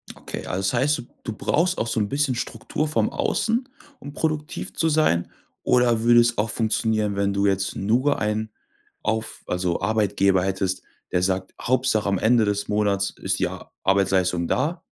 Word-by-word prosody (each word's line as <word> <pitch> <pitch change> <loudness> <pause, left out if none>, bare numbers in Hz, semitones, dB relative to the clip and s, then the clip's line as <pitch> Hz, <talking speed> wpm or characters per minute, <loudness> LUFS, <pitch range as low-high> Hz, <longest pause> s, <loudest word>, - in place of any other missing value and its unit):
Okay. - - -7
Also 90 - -3
das 95 - 0
heißt, 145 +2 +2
du - - -6 0.2
du 115 - -4
brauchst 170 - +1
auch 115 - -1
so 115 - 0
'n 100 - 0
bisschen 140 -2 +1
Struktur 120 +6 -3
vom 115 -7 +1
Außen, 235 +4 0 0.3
um 140 - -9
produktiv 155 -1 -3
zu 160 - +1
sein 150 - +2 0.3
oder 120 -2 +3
würde 120 0 +6
es 120 0 +3
auch 105 +1 0
funktionieren, 110 -2 0
wenn 100 0 0
du 100 0 +1
jetzt 95 -1 0
nur 125 +8 +1
einen 110 +1 -1 0.5
auf 110 0 -3
also 90 -1 -1
Arbeitgeber 100 -3 +2
hättest, 95 -1 -1 0.3
der 90 - +1
sagt: 95 0 -1
„Hauptsache 125 -4 +1
am 100 - +1
Ende 115 0 +4
des 105 0 -1
Monats 100 -2 +1
ist - - -2
die - - +2
A - - -9
Arbeitsleistung 95 -3 +2
da?“ 150 - 0
110 Hz, 175 wpm, -24 LUFS, 100-125 Hz, 0.5 s, würde